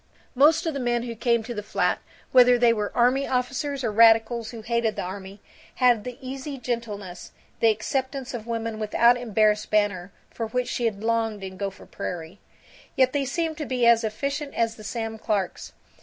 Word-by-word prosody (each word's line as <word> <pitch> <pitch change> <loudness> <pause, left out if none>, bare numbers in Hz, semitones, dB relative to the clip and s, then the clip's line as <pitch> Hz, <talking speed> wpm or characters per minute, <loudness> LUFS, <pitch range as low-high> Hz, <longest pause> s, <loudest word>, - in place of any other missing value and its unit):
Most 310 +6 +4
of 325 - -1
the 280 - -3
men 240 -2 0
who 240 -1 -5
came 235 0 +1
to 240 +2 -6
the 210 - -4
flat, 210 - 0 0.3
whether 250 -1 +7
they 240 -1 +4
were 210 -2 -2
army 255 +3 +3
officers 265 +2 -2
or 225 - 0
radicals 225 +1 +4
who 225 -2 -9
hated 235 -1 0
the - - -3
army, 195 +2 -8 0.3
had 245 -4 +3
the 250 -1 -6
easy 270 +1 -6
gentleness, 215 -7 -5 0.3
the 230 - +5
acceptance 260 +4 -2
of 235 -2 -6
women 230 -1 -3
without 235 +3 +4
embarrassed 215 -3 +1
banter, 200 -3 0 0.2
for 225 - -4
which 250 +2 -2
she 240 - -2
had 210 -2 -2
longed 225 -3 0
in 190 0 -7
Gopher 195 0 -6
Prairie. 175 +2 -6 0.6
Yet 260 -1 +3
they 285 -1 0
seemed 320 +3 -2
to 300 - -3
be 250 -2 +1
as 235 0 +5
efficient 280 +6 -3
as 230 -1 0
the 215 - -12
Sam 225 +1 -4
Clarks. 205 -5 -2
230 Hz, 185 wpm, -25 LUFS, 215-250 Hz, 0.6 s, whether